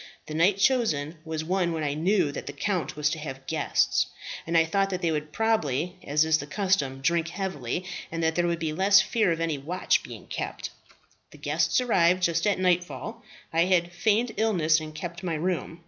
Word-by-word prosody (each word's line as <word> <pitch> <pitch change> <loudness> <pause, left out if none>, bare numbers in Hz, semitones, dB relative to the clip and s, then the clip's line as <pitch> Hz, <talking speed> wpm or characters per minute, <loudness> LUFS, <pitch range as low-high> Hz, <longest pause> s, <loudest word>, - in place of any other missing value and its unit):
The 155 - -7
night 180 +5 +3
chosen 175 - +1
was 160 -1 -4
one 175 0 0
when 160 -1 -2
I 145 -1 0
knew 170 0 +1
that - - -7
the 140 - -5
count 165 0 -2
was 150 0 0
to 160 - -3
have 135 -3 -7
guests, 160 +1 +1 0.4
and 165 0 +2
I 165 - +5
thought 195 +4 +1
that 185 -2 -4
they 165 - +2
would 150 -1 -3
probably, 180 - 0
as 150 +2 +2
is 160 0 +3
the 145 - -6
custom, 150 -7 0
drink 170 +3 +1
heavily, 175 -4 -3 0.3
and 165 0 -3
that 160 0 +2
there 175 +1 +1
would 170 0 0
be 160 -2 -2
less 195 +4 +5
fear 205 0 +2
of 165 - -1
any 165 -3 -1
watch 170 +7 0
being - - -10
kept. - - -5 0.6
"The - - -15
guests - - +1
arrived 185 -7 +3
just 170 +1 +2
at 205 - +2
nightfall. 185 +5 -1 0.3
I 165 +1 +4
had 175 -2 +1
feigned 220 +5 +1
illness, 175 -8 +3
and 155 -1 -8
kept 170 +3 -6
my 175 -3 -2
room. 170 0 -2
170 Hz, 205 wpm, -27 LUFS, 155-190 Hz, 0.6 s, I